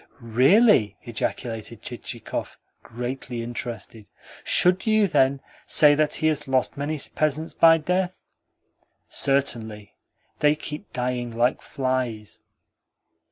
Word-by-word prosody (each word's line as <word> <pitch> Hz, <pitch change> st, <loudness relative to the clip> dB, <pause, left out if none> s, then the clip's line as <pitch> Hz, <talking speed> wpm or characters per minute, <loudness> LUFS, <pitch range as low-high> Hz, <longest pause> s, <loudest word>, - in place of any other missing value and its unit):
"Really?" 125 Hz, -, +4 dB
ejaculated 115 Hz, -1 st, -4 dB
Chichikov, 120 Hz, -1 st, -6 dB, 0.2 s
greatly 120 Hz, 0 st, -6 dB
interested. 115 Hz, -2 st, -7 dB, 0.4 s
"Should 180 Hz, +4 st, +3 dB
you, 215 Hz, -1 st, +4 dB
then, 135 Hz, -6 st, +2 dB, 0.3 s
say 150 Hz, -2 st, +6 dB
that 150 Hz, 0 st, +1 dB
he -, -, -3 dB
has 150 Hz, -2 st, 0 dB
lost 130 Hz, -1 st, 0 dB
many 145 Hz, +2 st, -3 dB
peasants 155 Hz, +1 st, -1 dB
by 165 Hz, 0 st, +6 dB
death?" 180 Hz, +3 st, -1 dB, 0.9 s
"Certainly. 110 Hz, -7 st, -1 dB, 0.5 s
They 150 Hz, 0 st, +4 dB
keep 150 Hz, 0 st, -8 dB
dying 125 Hz, -1 st, -2 dB
like 120 Hz, +2 st, +1 dB
flies." 130 Hz, -6 st, -3 dB
130 Hz, 105 wpm, -24 LUFS, 120-155 Hz, 0.9 s, say